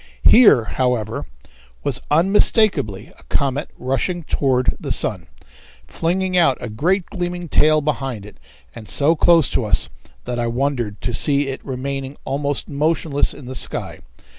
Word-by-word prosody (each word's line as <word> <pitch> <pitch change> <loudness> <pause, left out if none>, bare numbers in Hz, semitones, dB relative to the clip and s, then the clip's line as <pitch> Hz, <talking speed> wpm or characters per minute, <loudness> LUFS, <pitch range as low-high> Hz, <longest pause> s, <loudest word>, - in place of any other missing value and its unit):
Here, 220 - +7
however, 120 -2 -2 0.6
was - - -1
unmistakably 180 - +2
a - - -15
comet 140 +1 -1
rushing 135 +8 -2
toward 130 -4 0
the - - -6
sun, - - -2 0.6
flinging 185 +2 -1
out 150 -8 +4
a 120 - -6
great 175 - 0
gleaming 175 -2 -4
tail 155 0 +3
behind 135 -8 -3
it 105 - -13 0.4
and 110 -3 -10
so 150 +4 +3
close 165 0 +4
to - - 0
us 105 -4 +1 0.4
that 120 0 -3
I 120 - 0
wondered 120 -4 -2
to 120 - -3
see 140 +4 +1
it 135 - -6
remaining 135 +1 -5
almost 140 +1 -2
motionless 150 0 0
in 145 - -8
the 130 - -6
sky. 130 - -3
140 Hz, 145 wpm, -20 LUFS, 125-165 Hz, 0.6 s, Here